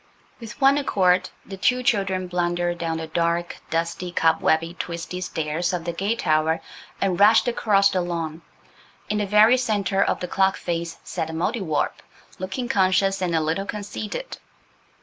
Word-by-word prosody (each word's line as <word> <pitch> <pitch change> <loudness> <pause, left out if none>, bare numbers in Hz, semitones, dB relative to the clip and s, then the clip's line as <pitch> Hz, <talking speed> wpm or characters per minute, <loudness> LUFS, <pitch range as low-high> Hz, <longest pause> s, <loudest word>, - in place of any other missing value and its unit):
With 230 -1 -10
one 275 +1 +5
accord 185 -8 +2 0.2
the 195 - -8
two 250 +6 +1
children 195 -5 +1
blundered 175 -1 -1
down 165 -1 -2
the 160 - -4
dark, 170 +1 -1
dusty, 170 +2 -2
cobwebby, 165 0 +2
twisty 170 +1 -5
stairs 165 +1 -2
of 170 -2 -3
the 170 - -2
gate 200 +6 -1
tower 160 -2 +1 0.4
and 190 -3 0
rushed 215 +4 +6
across 200 -4 +3
the 185 - 0
lawn. 165 -2 -4 0.7
In 210 - 0
the 205 - -1
very 215 +5 +6
centre 205 -5 0
of - - -1
the 180 - -4
clock 190 +1 +2
face 170 -1 -3
sat 160 - -3
the 160 - -7
Mouldiwarp, 165 -1 -1 0.4
looking 195 +7 -4
conscious 195 -1 +2
and 175 -2 0
a 160 - +2
little 165 +6 -1
conceited. 210 - -5
185 Hz, 160 wpm, -23 LUFS, 170-205 Hz, 0.7 s, rushed